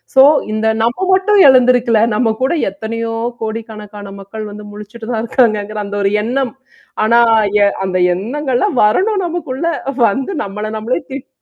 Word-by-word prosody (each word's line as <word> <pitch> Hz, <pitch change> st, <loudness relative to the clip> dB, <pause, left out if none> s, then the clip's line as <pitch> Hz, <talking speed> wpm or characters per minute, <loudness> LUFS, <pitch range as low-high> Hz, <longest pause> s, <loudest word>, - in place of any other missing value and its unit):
So 265 Hz, -, +8 dB, 0.3 s
இந்த 215 Hz, +1 st, -1 dB, 0.2 s
நம்ம 245 Hz, +11 st, 0 dB
மட்டும் 400 Hz, +2 st, +3 dB
எழுந்திருக்கல, 250 Hz, -3 st, +4 dB, 0.2 s
நம்ம 225 Hz, 0 st, +1 dB
கூட 265 Hz, +5 st, +1 dB, 0.2 s
எத்தனையோ 225 Hz, +3 st, -5 dB, 0.3 s
கோடிக்கணக்கான 215 Hz, -2 st, -7 dB
மக்கள் 210 Hz, +2 st, -8 dB
வந்து 210 Hz, +1 st, -10 dB
முழிச்சுட்டு 210 Hz, +2 st, -10 dB
தான் 225 Hz, -2 st, -1 dB
இருக்காங்கங்கற 215 Hz, -3 st, 0 dB
அந்த 200 Hz, 0 st, -5 dB
ஒரு 195 Hz, -, +1 dB
எண்ணம். 250 Hz, +1 st, -2 dB, 0.5 s
ஆனா 235 Hz, +2 st, +4 dB, 0.7 s
அந்த 185 Hz, -1 st, -1 dB, 0.2 s
எண்ணங்கள்லாம் 255 Hz, +6 st, -2 dB
வரணும் 385 Hz, -, +2 dB
நமக்குள்ள 330 Hz, -4 st, -4 dB, 0.4 s
வந்து 265 Hz, -, -3 dB
நம்மள 210 Hz, +2 st, -5 dB
நாமே 225 Hz, +4 st, -2 dB
திட்டி, 270 Hz, 0 st, -9 dB
230 Hz, 135 wpm, -15 LUFS, 210-260 Hz, 0.7 s, So